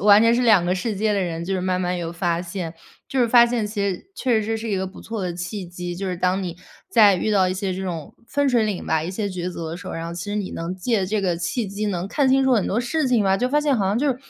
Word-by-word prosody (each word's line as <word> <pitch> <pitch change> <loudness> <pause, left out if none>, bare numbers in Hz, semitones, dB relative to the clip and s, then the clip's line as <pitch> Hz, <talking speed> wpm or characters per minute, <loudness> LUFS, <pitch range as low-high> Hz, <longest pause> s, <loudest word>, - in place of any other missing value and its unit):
完 205 +2 +7
全 230 +1 +5
是 245 - +2
两 215 -7 +5
个 180 +1 +1
世 205 +3 -2
界 215 +2 +1
的 200 - +1
人， 170 -2 -3
就 190 +2 -2
是 185 - -1
慢 185 0 0
慢 180 0 -1
有 170 -2 -3
发 170 -1 0
现。 175 -2 -5 0.3
就 265 - -1
是 240 - +3
发 240 0 +7
现 235 -2 -1
其 210 0 -4
实 185 - -11
确 245 -8 +1
实 - - -3
是， 225 +1 -1
是 225 +1 -5
一 200 - +1
个 190 0 -1
不 190 - -11
错 225 -3 -5
的 180 -1 -2
契 180 +3 -5
机， 175 0 -6
就 195 +3 -4
是 180 - -2
当 185 +2 +1
你 175 -2 -5 0.3
在 210 -4 +6
遇 200 +4 -1
到 190 -3 +3
一 185 - -1
些 190 0 -2
这 190 +1 -4
种 170 -5 -5
分 285 +2 +1
水 240 -4 +3
岭 205 -4 -2
吧， 160 -1 +1
一 165 - -3
些 205 +2 -2
抉 180 -2 -4
择 165 -2 -5
的 165 - -5
时 180 - -11
候， - - -5
然 165 0 -4
后 170 - -5
其 175 - -5
实 205 0 -4
你 205 -3 -2
能 170 +2 -4
借 195 +2 0
这 210 +2 0
个 180 -3 0
契 175 +7 -2
机， 200 +2 -3
能 185 -2 -2
看 275 +4 +2
清 270 +1 +4
楚 265 -1 +3
很 215 - +1
多 215 - 0
事 295 +5 0
情 245 -4 +3
吧。 195 -1 +3
就 250 +5 0
发 295 +3 +2
现 290 -3 +2
好 205 - 0
像 200 +3 +1
就， 270 0 +1
195 Hz, 340 characters per minute, -23 LUFS, 180-225 Hz, 0.3 s, 完